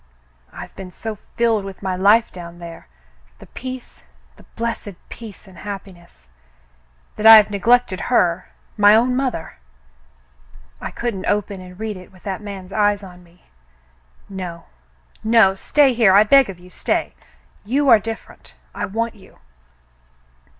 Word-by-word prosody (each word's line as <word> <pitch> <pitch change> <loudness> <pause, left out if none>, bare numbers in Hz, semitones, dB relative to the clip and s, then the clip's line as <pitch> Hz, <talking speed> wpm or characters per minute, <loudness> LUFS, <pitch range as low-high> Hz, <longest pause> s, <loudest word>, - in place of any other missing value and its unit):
I've - - -10
been 190 -1 -8
so 215 +3 -7 0.2
filled 230 -3 +2
with 195 0 -9
my 190 -1 -1
life 205 +5 +4
down 175 -1 -10
there 170 - -11 0.3
— - - -33
the - - -14
peace, 255 -1 -9 0.3
the - - -19
blessed 230 -4 -4
peace 215 -3 -11
and 185 -3 -15
happiness 185 - -10 0.5
— - - -37
that 215 - +3
I 225 - +12
have 210 -1 +6
neglected 205 0 +2
her 180 -7 +1
— - - -36
my 205 +1 +7
own 245 +3 +3
mother. 250 - -3 1.2
I - - -4
couldn't 230 -6 -4
open 205 -2 -1
and 180 +1 -13
read 215 -2 -4
it 185 - -14
with 185 -2 -20
that 195 0 -4
man's 195 -2 -8
eyes 205 -1 +1
on 180 -2 -12
me. 175 +1 -24 0.8
No, 180 -4 -7 0.6
no. 220 -3 +5
Stay 270 +7 +2
here, 225 -5 +4
I 205 - +8
beg 270 +2 +5
of 190 - -7
you, 180 +1 -17
stay. - - -2 0.5
You 275 +7 0
are 230 -3 +8
different. 225 +2 -9 0.2
I - - -3
want 230 +3 -2
you." 195 -4 -19
200 Hz, 155 wpm, -20 LUFS, 180-225 Hz, 1.2 s, I